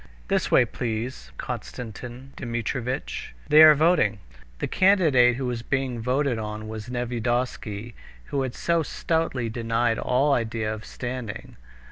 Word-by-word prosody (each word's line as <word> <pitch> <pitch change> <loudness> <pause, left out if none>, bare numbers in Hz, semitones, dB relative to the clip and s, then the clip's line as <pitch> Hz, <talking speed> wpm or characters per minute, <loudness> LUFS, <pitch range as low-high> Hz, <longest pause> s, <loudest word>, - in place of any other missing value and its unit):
"This - - +1
way, - - +5
please, 120 +1 -4
Konstantin 125 +3 -7
Dmitrievitch; 120 - -3
they 150 +1 +8
are 155 -1 +10
voting." 150 - +3 0.4
The - - -2
candidate 155 -11 +4
who 130 +1 -3
was 120 -2 -2
being 130 -1 -1
voted 130 0 0
on 105 0 -5
was 110 +1 -7
Nevyedovsky, 120 -2 -2 0.4
who 140 - 0
had 130 -2 -3
so 170 -1 +1
stoutly 160 -6 -1
denied 115 0 0
all 140 +3 +2
idea 110 -3 -1
of 110 0 -8
standing. 125 -4 -6
125 Hz, 130 wpm, -25 LUFS, 115-135 Hz, 0.4 s, are